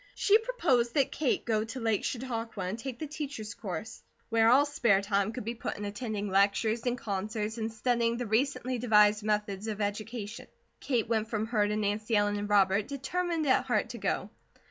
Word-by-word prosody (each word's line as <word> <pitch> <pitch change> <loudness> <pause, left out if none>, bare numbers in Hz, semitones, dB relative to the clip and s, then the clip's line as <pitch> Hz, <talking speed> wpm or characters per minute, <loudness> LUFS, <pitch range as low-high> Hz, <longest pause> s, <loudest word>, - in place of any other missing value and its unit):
She 420 +2 +5
proposed 320 - +1
that 275 -3 +3
Kate 285 -4 0
go 215 -2 +1
to 225 +4 -6
Lake 225 -3 0
Chautauqua 230 -5 -3
and 190 +5 -3
take 255 0 -5
the 310 - -4
teachers' 280 -8 -5
course, 205 +2 -6 0.3
where 225 0 +4
all 270 +4 +6
spare 235 -9 +3
time 200 0 0
could 250 0 -6
be 230 - -2
put 235 - -5
in 205 - -5
attending 210 -1 -3
lectures, 205 +4 +2
and 245 0 0
concerts, 215 +2 -3
and 220 0 -2
studying 235 +1 0
the 245 - -3
recently 255 +2 0
devised 210 -2 +5
methods 210 -1 -1
of 215 -1 -3
education. 215 +2 -4 0.3
Kate 245 -6 0
went 220 -1 0
from 220 -1 -1
her 215 -3 +1
to 210 - -1
Nancy 215 +2 0
Ellen 205 0 +2
and 205 0 -4
Robert, 200 0 +3
determined 320 +4 -2
at 260 -1 +3
heart 235 -2 +1
to 235 0 -7
go. 200 +1 -2
225 Hz, 190 wpm, -30 LUFS, 210-250 Hz, 0.3 s, all